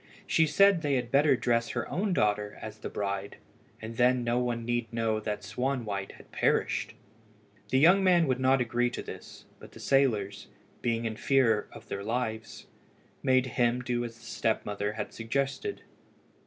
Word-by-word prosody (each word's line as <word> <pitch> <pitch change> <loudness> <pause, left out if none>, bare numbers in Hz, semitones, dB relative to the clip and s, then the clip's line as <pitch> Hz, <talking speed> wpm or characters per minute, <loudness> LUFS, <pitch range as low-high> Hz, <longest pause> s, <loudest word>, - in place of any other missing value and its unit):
She 160 - +3
said 195 +1 +5
they 145 -3 +1
had 120 -2 -2
better 140 0 +5
dress 115 -1 0
her - - -3
own 200 +2 -1
daughter 105 - 0
as 110 0 -8
the - - -5
bride, 100 -1 -3 0.4
and 110 +1 -8
then 125 0 +3
no 120 +1 +1
one 120 -2 -2
need 120 -1 -1
know 115 -2 0
that 105 -1 -4
Swanwhite 110 -3 -3
had - - -17
perished. - - 0 0.7
The 130 - +2
young 180 +8 +6
man 175 -3 +5
would 130 -3 0
not 130 0 +3
agree 120 0 +1
to - - -6
this, - - -10
but - - -14
the - - -12
sailors, 110 -7 +1 0.3
being 115 -1 -1
in 110 -1 -3
fear 115 -6 +2
of - - -13
their 100 - -4
lives, 110 -1 -3 0.6
made 130 0 +3
him 120 0 0
do 120 -1 -1
as 115 -1 -7
the 115 - -17
step 110 -1 -1
mother 105 0 -2
had 105 -1 -5
suggested. 140 - -2
120 Hz, 175 wpm, -29 LUFS, 110-130 Hz, 0.7 s, young